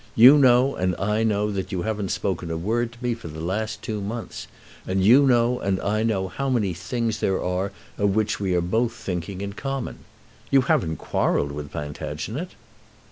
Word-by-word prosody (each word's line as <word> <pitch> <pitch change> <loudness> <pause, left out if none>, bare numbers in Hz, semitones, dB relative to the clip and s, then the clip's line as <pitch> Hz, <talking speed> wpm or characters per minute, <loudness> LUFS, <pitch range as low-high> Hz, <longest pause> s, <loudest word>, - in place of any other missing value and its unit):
You 130 +6 +9
know, 130 0 +5
and 90 -1 0
I 105 +3 0
know, 105 -1 +1
that 95 0 -4
you 90 -3 -2
haven't 105 -3 -2
spoken 95 -3 -2
a 80 - -2
word 115 +7 -1
to 120 +1 -14
me 120 -1 +1
for 115 -7 -9
the 80 0 -8
last 100 +7 -3
two 105 -2 -3
months. 110 +3 -5 0.4
And 95 0 +1
you 135 +6 +7
know, 120 0 +3
and 95 -1 0
I 105 +2 0
know, 105 -4 0
how 135 +9 -3
many 110 -8 +1
things 115 +6 -2
there 95 -1 +1
are 90 +3 -1 0.3
of 100 -1 +2
which 110 0 0
we 95 -3 0
are 90 - +2
both 115 +7 0
thinking 95 -3 -5
in 100 0 -4
common. 135 +4 -4 0.5
You 135 - +5
haven't 80 -9 +1
quarrelled 70 - 0
with 75 0 -6
Plantagenet?" 75 - -5
105 Hz, 190 wpm, -24 LUFS, 90-120 Hz, 0.5 s, You